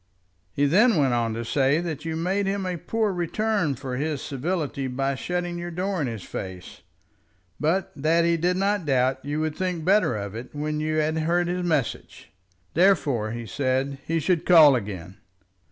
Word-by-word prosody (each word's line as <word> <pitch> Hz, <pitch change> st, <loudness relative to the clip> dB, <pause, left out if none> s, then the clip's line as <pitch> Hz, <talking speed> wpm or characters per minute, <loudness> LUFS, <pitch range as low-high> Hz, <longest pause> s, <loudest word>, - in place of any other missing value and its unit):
"He 140 Hz, +9 st, +1 dB
then 210 Hz, -, +4 dB
went 135 Hz, -5 st, +2 dB
on 115 Hz, -2 st, 0 dB
to 115 Hz, +1 st, -4 dB
say 135 Hz, +5 st, +2 dB
that 165 Hz, -3 st, -5 dB
you 160 Hz, -1 st, -2 dB
made 190 Hz, +4 st, 0 dB
him 195 Hz, 0 st, -1 dB
a 180 Hz, -1 st, -2 dB
poor 215 Hz, +4 st, -1 dB
return 180 Hz, -2 st, 0 dB
for 130 Hz, -1 st, -5 dB
his 150 Hz, +1 st, -2 dB
civility 145 Hz, -1 st, -3 dB
by 135 Hz, +2 st, -1 dB
shutting 175 Hz, +4 st, -3 dB
your 175 Hz, 0 st, -5 dB
door 185 Hz, +1 st, -2 dB
in 140 Hz, -, 0 dB
his 115 Hz, -5 st, -5 dB
face, 95 Hz, -2 st, -8 dB, 0.8 s
but 170 Hz, +5 st, 0 dB
that 160 Hz, +4 st, +2 dB
he 170 Hz, 0 st, +3 dB
did 175 Hz, +2 st, 0 dB
not 200 Hz, -3 st, 0 dB
doubt 130 Hz, -1 st, +1 dB
you 145 Hz, +2 st, -2 dB
would 155 Hz, -1 st, -2 dB
think 180 Hz, -4 st, -2 dB
better 195 Hz, -, +3 dB
of 100 Hz, -1 st, -5 dB
it 120 Hz, +5 st, -8 dB
when 150 Hz, +1 st, -2 dB
you 155 Hz, 0 st, -1 dB
had 155 Hz, +1 st, +1 dB
heard 170 Hz, +2 st, +1 dB
his 180 Hz, +1 st, -2 dB
message. 155 Hz, -8 st, -2 dB, 0.4 s
Therefore, 145 Hz, -, +3 dB
he 115 Hz, +1 st, -5 dB
said, 135 Hz, +4 st, -1 dB
he 165 Hz, 0 st, -1 dB
should 170 Hz, +1 st, +1 dB
call 155 Hz, -6 st, +7 dB
again. 95 Hz, -5 st, -5 dB
155 Hz, 185 wpm, -25 LUFS, 130-175 Hz, 0.8 s, call